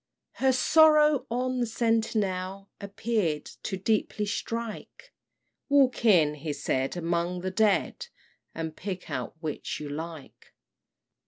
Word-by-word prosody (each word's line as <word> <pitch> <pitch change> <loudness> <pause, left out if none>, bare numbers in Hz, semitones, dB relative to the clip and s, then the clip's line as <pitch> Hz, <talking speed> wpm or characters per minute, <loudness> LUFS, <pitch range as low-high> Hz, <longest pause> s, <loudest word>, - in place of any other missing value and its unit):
Her 265 0 +5
sorrow 300 0 +5
on 255 +2 -1
the 240 - 0
sentinel 200 -4 -1
Appear'd 200 -6 -1 0.2
to 190 - -3
deeply 210 +1 0
strike: 225 +1 -5 0.6
"Walk 270 -4 +3
in," 165 -9 +5
he 150 0 -5
said, 135 +3 -2
"among 175 +1 -1
the 185 +1 -3
dead, 210 - +1 0.5
And 160 -1 -4
pick 185 -2 -6
out - - -4
which 155 -3 -4
you 150 - -6
like." 160 0 -8
200 Hz, 115 wpm, -27 LUFS, 170-235 Hz, 0.6 s, Her